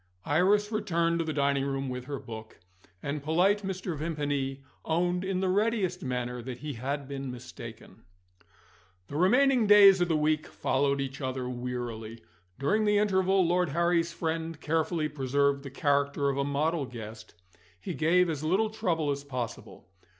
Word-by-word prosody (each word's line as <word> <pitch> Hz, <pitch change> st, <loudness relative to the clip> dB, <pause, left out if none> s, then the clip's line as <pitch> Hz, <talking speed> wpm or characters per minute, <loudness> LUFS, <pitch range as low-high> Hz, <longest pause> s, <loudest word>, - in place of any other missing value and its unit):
Iris 200 Hz, +7 st, +3 dB
returned 170 Hz, -6 st, 0 dB
to 165 Hz, -, 0 dB
the 160 Hz, -, -2 dB
dining 140 Hz, -2 st, +1 dB
room 135 Hz, 0 st, -2 dB
with 125 Hz, -1 st, -5 dB
her 140 Hz, +1 st, -4 dB
book; 110 Hz, -2 st, -9 dB, 0.4 s
and 145 Hz, +1 st, -3 dB
polite 180 Hz, +8 st, +2 dB
Mr. 190 Hz, -3 st, -4 dB
Vimpany 145 Hz, -3 st, -2 dB, 0.2 s
owned 175 Hz, +2 st, 0 dB
in 190 Hz, -1 st, -1 dB
the 190 Hz, -, +1 dB
readiest 195 Hz, -2 st, +1 dB
manner 125 Hz, -1 st, -3 dB
that 125 Hz, 0 st, -6 dB
he 145 Hz, +3 st, -5 dB
had 135 Hz, +3 st, -4 dB
been 135 Hz, -1 st, -5 dB
mistaken. 125 Hz, -1 st, -10 dB, 1.1 s
The 145 Hz, -, -7 dB
remaining 245 Hz, -, +4 dB
days 200 Hz, -2 st, +8 dB
of 175 Hz, -, +3 dB
the 160 Hz, -2 st, +2 dB
week 155 Hz, 0 st, +1 dB
followed 140 Hz, +1 st, 0 dB
each 135 Hz, +1 st, -5 dB
other 130 Hz, -1 st, -3 dB
wearily. 120 Hz, -3 st, -5 dB, 0.3 s
During 210 Hz, +11 st, +1 dB
the 210 Hz, 0 st, +3 dB
interval, 190 Hz, -2 st, +3 dB
Lord 175 Hz, 0 st, +2 dB
Harry's 170 Hz, +2 st, +1 dB
friend 165 Hz, -1 st, -3 dB
carefully 160 Hz, 0 st, 0 dB
preserved 140 Hz, 0 st, +1 dB
the 140 Hz, -, -8 dB
character 140 Hz, 0 st, +1 dB
of 135 Hz, -, -1 dB
a -, -, +2 dB
model 145 Hz, +1 st, 0 dB
guest 110 Hz, -2 st, -9 dB, 0.4 s
he 180 Hz, -, -5 dB
gave 170 Hz, +5 st, +3 dB
as 155 Hz, -3 st, -3 dB
little 195 Hz, +7 st, +1 dB
trouble 165 Hz, -8 st, 0 dB
as 140 Hz, 0 st, -3 dB
possible. 125 Hz, -9 st, -6 dB
150 Hz, 160 wpm, -29 LUFS, 135-180 Hz, 1.1 s, days